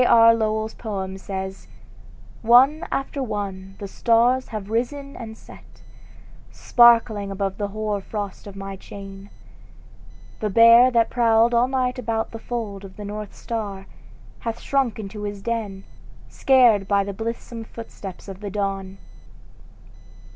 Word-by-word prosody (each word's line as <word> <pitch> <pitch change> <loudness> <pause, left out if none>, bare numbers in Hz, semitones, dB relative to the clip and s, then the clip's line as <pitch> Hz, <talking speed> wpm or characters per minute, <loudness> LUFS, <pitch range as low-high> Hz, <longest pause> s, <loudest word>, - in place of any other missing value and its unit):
R. 230 -1 +7
Lowell's 220 -1 -1
poem, 195 -4 -5
says: 190 0 -6 0.7
"One 260 +8 +5
after 275 +1 -2
one 195 -5 -5
the 200 - -6
stars 240 +5 +2
have 215 -2 -6
risen 275 +5 -2
and 220 -2 -8
set, - - -16 0.7
Sparkling 230 -4 +4
upon 195 0 -2
the 205 - -1
hoar 210 0 -3
frost 205 0 -6
of 200 - -10
my 195 0 -6
chain; 195 0 -11 1.1
The 215 - -1
Bear 230 +4 +7
that 230 -2 +2
prowled 230 0 +3
all 240 +1 +4
night 255 -1 -1
about 225 -2 -2
the 225 - -7
fold 220 -5 -5
Of 190 -1 -12
the 210 - -7
North 210 0 -6
star, 205 -4 -5 0.5
hath 230 0 -4
shrunk 270 -5 0
into 210 0 -7
his 205 -1 -5
den, 215 -5 -3 0.5
Scared 240 -7 +4
by 200 0 +3
the 200 0 -5
blithesome 230 +2 -5
footsteps 210 -5 -10
of 195 -1 -8
the 205 -1 -5
Dawn." 195 -1 -3
215 Hz, 140 wpm, -23 LUFS, 195-235 Hz, 1.1 s, R